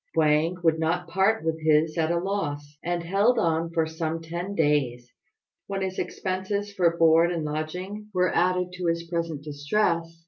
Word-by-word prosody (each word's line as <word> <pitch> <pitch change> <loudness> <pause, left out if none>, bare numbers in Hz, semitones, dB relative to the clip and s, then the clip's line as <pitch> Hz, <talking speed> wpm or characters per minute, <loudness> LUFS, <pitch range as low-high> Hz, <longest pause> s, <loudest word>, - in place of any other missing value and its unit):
Wang 160 +2 +3
would 160 -1 +3
not 170 +2 0
part 195 +5 +2
with 160 0 -1
his 155 0 +3
at 160 -2 +1
a 170 - +1
loss, 150 -6 -3
and 175 0 -1
held 200 +8 +2
on 165 -4 +1
for 165 -1 +1
some 160 0 -3
ten 170 +4 -5
days, 130 -6 0 0.5
when 195 -1 -2
his 190 0 -3
expenses 200 +2 -3
for 170 -3 +2
board 165 +1 +5
and 165 -3 -2
lodging 180 +8 -4
were 180 -2 +1
added 180 0 +1
to 180 -1 -3
his 170 0 0
present 165 -4 -3
distress. 165 +3 -1
170 Hz, 170 wpm, -26 LUFS, 160-185 Hz, 0.5 s, board